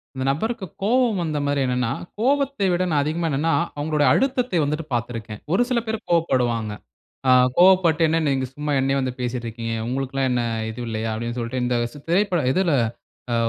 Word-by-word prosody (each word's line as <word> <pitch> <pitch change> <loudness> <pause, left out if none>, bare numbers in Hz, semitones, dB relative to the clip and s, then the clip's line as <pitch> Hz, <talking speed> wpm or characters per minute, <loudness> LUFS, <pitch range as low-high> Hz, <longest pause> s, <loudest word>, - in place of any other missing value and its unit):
அந்த 130 0 -3
நபருக்கு 220 +8 -2 0.2
கோவம் 235 -1 +2
வந்த 155 -2 -2
மாரி 145 0 +1
என்னன்னா? 125 -2 0 0.3
கோவத்தை 275 -3 +1
விட 175 +1 +1 0.2
அதிகமா 160 +4 -1
என்னன்னா, 155 +3 +1 0.2
அவுங்களுடைய 150 -1 +1
அழுத்தத்தை 250 -6 +1
வந்துட்டு 150 +2 -2
பாத்துருக்கேன். 115 -3 -4
ஒரு 190 - +3
சில 250 -2 +2
பேர் 220 0 -1
கோவப்படுவாங்க. 125 -10 +1 0.6
அ - - +6 0.3
"கோவப்பட்டு 175 -3 +5
என்ன 160 +1 +2
நீங்க 135 -1 0
சும்மா 150 +1 -3
என்னைய 135 +1 +1
வந்து 130 -1 -2
பேசிட்டு 125 -1 -3
இருக்கீங்க. 115 0 -5
உங்களுக்குல்லாம் 135 +1 -1
என்ன 125 -1 +1 0.3
இது 110 +2 -8
இல்லையா?", 110 0 -2
அப்டின்னு 120 +2 -4
சொல்லிட்டு 120 +2 -3
இந்த, 125 0 +1 0.2
ச - - -12
திரைப்ப 185 -1 +2
இதுல 185 -3 +2 0.6
அ - - +2
145 Hz, 170 wpm, -23 LUFS, 125-185 Hz, 0.6 s, அ